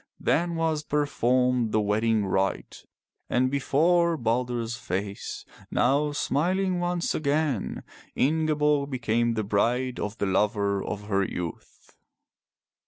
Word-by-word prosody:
Then 170 +2 +1
was 160 -2 0
performed 125 -5 +1
the 110 - +2
wedding 105 +1 +1
rite, 95 0 -2 0.4
and 130 +1 +2
before 165 +5 +2
Balder's 120 -1 -1
face, 100 -3 -5 0.2
now 140 +4 +2
smiling 180 +6 0
once 175 -1 -1
again, 145 -6 -1 0.3
Ingeborg 150 -1 +2
became 120 -2 0
the 110 - -1
bride 120 +5 0
of 105 +1 -4
the - - -1
lover 100 0 +1
of 105 -1 -5
her 100 -1 0
youth. 90 -3 -7
125 Hz, 110 wpm, -26 LUFS, 105-150 Hz, 0.4 s, the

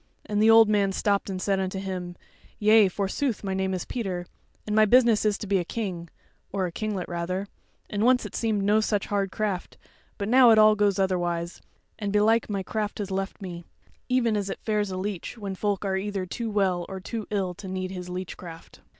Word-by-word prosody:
And 210 0 0
the 220 - +5
old 225 0 +8
man 205 -2 +2
stopped 200 +1 0
and 190 -1 -3
said 195 0 0
unto 190 0 -2
him: 185 -2 -5 0.4
"Yea, 215 0 +6
forsooth, 205 +6 -2
my 195 -1 -2
name 190 0 -1
is 185 -1 -3
Peter, 190 -7 -3 0.4
and 210 - -2
my 215 - +6
business 235 -1 +4
is 210 -1 +2
to - - -6
be 195 -1 +2
a - - -1
king, 175 -4 -4 0.4
or 190 -2 -1
a 175 - -4
kinglet 205 -1 -3
rather; 180 +3 -3 0.4
and 205 0 -2
once 250 +1 +4
it - - -8
seemed 215 -3 0
no 210 +2 +4
such 210 -2 0
hard 200 -2 -1
craft; 200 -4 -3 0.4
but 200 - -3
now 250 +1 +7
it 220 - +6
all 215 0 +7
goes 205 -2 +2
otherwise, 175 -3 -1 0.4
and 205 -2 -2
belike 215 +3 +3
my 200 -2 -2
craft 210 +1 -3
has 205 -2 -4
left 195 +1 -3
me; 175 -2 -6 0.5
even 240 -3 +2
as 200 -1 -2
it - - -5
fares 210 -2 0
with 185 - -4
a - - -3
leech 200 +2 -4
when 200 -3 -5
folk 200 +1 -1
are 190 -1 0
either 195 -1 -3
too 230 +5 -4
well 190 -4 +1
or 190 -1 -5
too 220 +3 -5
ill 195 -3 -1
to 190 +3 -10
need 185 0 -3
his 180 -1 -6
leech 180 0 -5
craft." 165 -2 -11
200 Hz, 220 wpm, -26 LUFS, 185-215 Hz, 0.5 s, old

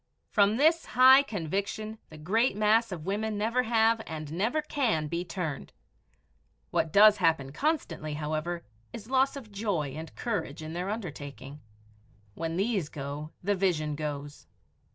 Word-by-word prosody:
From 205 +1 +3
this 320 +4 +4
high 260 +2 +9
conviction 205 - -4
the 155 - -12
great 210 +10 +1
mass 215 +1 +3
of 165 -4 -6
women 210 +2 -2
never 230 +4 +1
have 225 -1 +3
and 155 -1 -6
never 220 - 0
can 245 - 0
be 170 +3 -2
turned. 175 -6 -5 1.0
What 160 - 0
does 210 +2 +7
happen 160 -7 +1
constantly, 260 - -2
however, 155 +3 -3 0.3
is 225 +3 -9
loss 265 +1 +3
of 245 -7 -9
joy 200 -8 -1
and 160 +4 -8
courage 200 - -3
in 155 +1 -6
their 180 +3 -3
undertaking. 145 - -7 0.7
When 165 +6 -3
these 195 -6 0
go, 145 +2 -6
the 205 +3 +2
vision 175 -6 0
goes. 145 -1 -6
190 Hz, 145 wpm, -29 LUFS, 155-225 Hz, 1.0 s, high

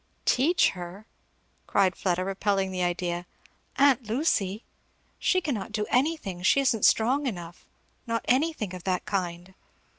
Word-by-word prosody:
"Teach 315 +8 +3
her?" 180 +3 -9 0.6
cried 190 -2 +2
Fleda, 185 -1 -1
repelling 195 0 0
the 185 -1 -3
idea; 175 0 -2 0.5
"aunt 275 -2 +4
Lucy? 220 - 0 0.6
she 370 - +2
cannot 235 - -3
do 210 -1 -1
anything 250 - 0
she 190 +9 +4
isn't 240 -6 +2
strong 265 +6 +3
enough; 175 -6 -7 0.4
not 230 0 -2
anything 260 - +1
of 180 -2 -8
that 185 -2 -1
kind." 180 -2 -3
200 Hz, 130 wpm, -27 LUFS, 180-255 Hz, 0.6 s, aunt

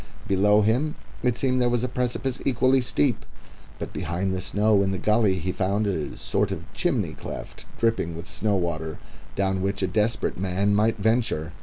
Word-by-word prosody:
Below 105 +1 +4
him 130 +9 +1 0.3
it 125 -2 +1
seemed 130 -1 +1
there 120 - +3
was 120 0 +1
a - - +1
precipice 125 +1 -2
equally 130 0 +3
steep, 75 -11 +1 0.5
but - - -6
behind 90 +4 -2
the 95 - -2
snow 105 +1 +3
in 95 - +1
the 95 - -1
gully 105 0 +3
he 90 +1 -2
found 100 +3 0
a 90 -7 -2
sort - - 0
of - - -4
chimney - - 0
cleft - - -8
dripping 115 -8 0
with 85 - -8
snow 105 -2 0
water 80 -3 -2 0.4
down 95 -1 0
which 100 +1 -1
a - - +2
desperate 105 +1 0
man 95 +2 +1
might 110 +2 +2
venture. 110 -7 0
105 Hz, 180 wpm, -25 LUFS, 95-115 Hz, 0.5 s, Below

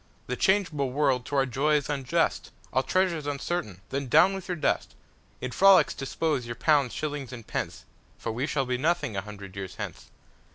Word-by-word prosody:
The 125 - -3
changeable 165 -6 +2
world 130 -2 +1
to 145 - -3
our 135 -1 +4
joy 140 +4 +1
is 145 -2 0
unjust, 135 -4 0 0.2
All 130 - +3
treasure's 170 -1 0
uncertain, 140 - -3
Then 140 0 -2
down 185 +10 +6
with 190 -2 -6
your 180 - -2
dust! - - 0 0.5
In 130 - -3
frolics 195 +5 +6
dispose 135 -1 -2
your 120 - -4
pounds, 140 -1 +3
shillings, 145 -4 -4
and 120 -3 -8
pence, - - -4 0.3
For 115 - -4
we 125 +6 -2
shall 135 -3 0
be 125 -1 -1
nothing 160 -7 0
a 95 - -1
hundred 100 -2 -10
years 95 -2 -6
hence. - - -7
135 Hz, 190 wpm, -27 LUFS, 125-155 Hz, 0.5 s, down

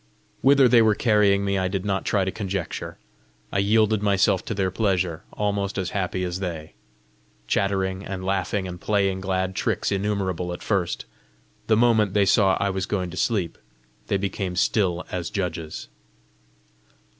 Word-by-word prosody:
Whither 135 -1 +6
they 120 -1 +6
were 110 -2 +4
carrying 105 -3 +3
me, 100 -1 +1
I 95 - 0
did 95 +1 -3
not 95 -1 -1
try 100 -2 +1
to 95 - -1
conjecture; 100 -4 -4 0.5
I 100 - 0
yielded 110 +1 +3
myself 100 -2 +2
to 115 - -3
their 95 -2 0
pleasure, 95 -5 0
almost 100 -1 -1
as 95 -2 -2
happy 95 -2 -2
as 90 0 -3
they. 85 -5 -5 0.7
Chattering 95 +3 0
and 95 -1 -5
laughing 95 0 -1
and 90 -1 -8
playing 100 -2 +1
glad 95 0 -1
tricks - - -1
innumerable 95 -3 -1
at 90 - -8
first, 95 -5 -1 0.6
the 110 - +4
moment 110 -4 +3
they 100 -1 +4
saw 95 0 +4
I 100 - +1
was 95 0 -3
going 90 -4 -2
to 90 - -8
sleep, 100 -8 -1 0.5
they 100 - +1
became 95 -1 -3
still 90 -2 +1
as 85 -2 -3
judges. 85 -5 -4
95 Hz, 160 wpm, -24 LUFS, 95-100 Hz, 0.7 s, Whither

